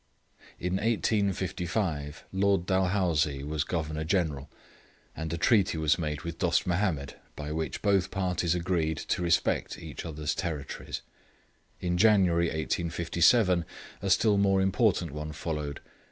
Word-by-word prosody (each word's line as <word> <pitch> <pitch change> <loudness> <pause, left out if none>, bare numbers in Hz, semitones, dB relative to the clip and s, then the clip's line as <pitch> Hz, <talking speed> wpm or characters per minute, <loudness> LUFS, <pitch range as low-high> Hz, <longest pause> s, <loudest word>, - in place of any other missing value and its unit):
In 90 +2 -1
1855, 95 -7 -1
Lord 95 -2 +2
Dalhousie 90 -7 +1
was 75 +1 -1
Governor 80 -2 -3
General, 80 -5 -1 0.7
and 80 -1 -4
a 85 - -2
treaty 95 -2 +3
was 80 +2 +2
made 75 -3 -3
with 85 -1 -6
Dost 90 -3 +2
Mahomed, 85 -6 -1 0.2
by 75 0 -5
which 80 +1 -3
both 100 -3 +2
parties 90 -3 0
agreed 85 -3 0
to - - -2
respect 85 -2 +1
each - - -8
other's 75 -3 -3
territories. 75 -6 -4 0.8
In 90 0 -1
January, 95 -5 +4
1857, 85 +4 +2 0.4
a 100 - -2
still 105 +1 +4
more 95 -1 +3
important 95 - +2
one 75 +1 -5
followed. 75 -2 -4
85 Hz, 125 wpm, -29 LUFS, 80-95 Hz, 0.8 s, January